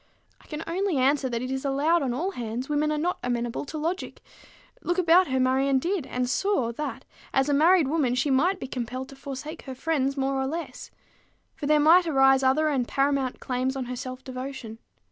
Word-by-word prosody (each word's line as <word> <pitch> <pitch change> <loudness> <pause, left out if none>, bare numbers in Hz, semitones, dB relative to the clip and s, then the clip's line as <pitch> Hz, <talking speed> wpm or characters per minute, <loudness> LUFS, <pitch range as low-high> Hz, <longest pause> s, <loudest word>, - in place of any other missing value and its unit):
I - - -21
can 305 +1 -5
only 365 -1 -1
answer 265 +1 +2
that 235 0 -2
it 255 - -4
is 265 0 -3
allowed 290 +5 +2
on 265 -3 -1
all 330 +11 -2
hands 240 - -5
women 300 +1 +1
are 305 - 0
not 350 +4 -1
amenable 240 +1 -2
to 310 - -6
logic: 335 +5 -4 0.6
look 350 +1 -1
about 360 +1 +5
her 260 0 0
Marion 265 +1 +2
did, 340 0 -1
and 250 0 -2
saw, 260 - 0
that, 300 +6 -5 0.3
as 270 +2 +3
a - - +2
married 325 +2 +5
woman, 275 -5 +1
she 270 +3 +1
might 355 +9 +2
be - - -5
compelled 255 +1 -5
to 275 - -11
forsake 280 +4 -7
her 265 -2 -6
friends 275 -1 -1
more 270 0 0
or 265 - -1
less; 330 +4 -6 0.6
for 285 - -5
there 305 0 +4
might 335 +4 +6
arise 270 -3 +4
other 270 +4 +3
and 265 -5 0
paramount 275 -2 0
claims 255 +1 -2
on 265 -2 -3
her 250 +1 -5
self 255 0 -7
devotion. 255 -3 -7
275 Hz, 205 wpm, -26 LUFS, 255-310 Hz, 0.6 s, might